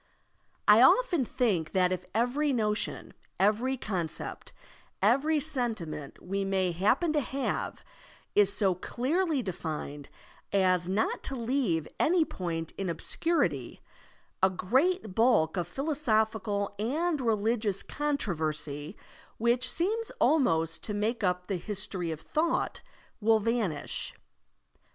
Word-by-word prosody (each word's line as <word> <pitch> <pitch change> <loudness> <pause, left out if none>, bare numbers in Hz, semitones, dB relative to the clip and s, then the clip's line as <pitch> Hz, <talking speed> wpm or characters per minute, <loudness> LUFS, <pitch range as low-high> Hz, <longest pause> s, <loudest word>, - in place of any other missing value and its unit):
I - - +8
often 430 - +5
think 220 - 0
that 185 -1 +3
if 180 0 -3
every 255 +6 +1
notion, 215 -4 -1 0.3
every 225 +7 +2
concept, 175 -9 -4 0.5
every 275 +10 +3
sentiment 225 - -3
we 195 +2 -2
may 190 -2 +1
happen 220 - +2
to 300 - +3
have, 270 +1 -3 0.5
is 205 -1 +4
so 200 -2 +2
clearly 280 - -1
defined 155 -6 -5 0.4
as 185 -2 +2
not 205 +4 0
to 270 - -3
leaVe 230 - 0
any 335 0 +3
point 170 - -4
in 195 -2 -1
obscurity, 330 - -1 0.6
a 190 - +5
great 255 - +1
bulk 220 - +3
of 175 -2 -1
philosophical 220 - 0
and 300 +7 0
religious 220 -3 0
controversy, 160 - -2 0.4
which 240 +2 +2
seems 435 +7 -1
almost 165 - +2
to 210 - -3
make 215 +2 -1
up 180 -1 0
the 195 -1 -2
history 190 -2 -3
of 160 -1 -5
thought, 330 +2 -1 0.4
will 225 0 +4
vanish. 215 -8 -2
215 Hz, 115 wpm, -29 LUFS, 180-265 Hz, 0.6 s, I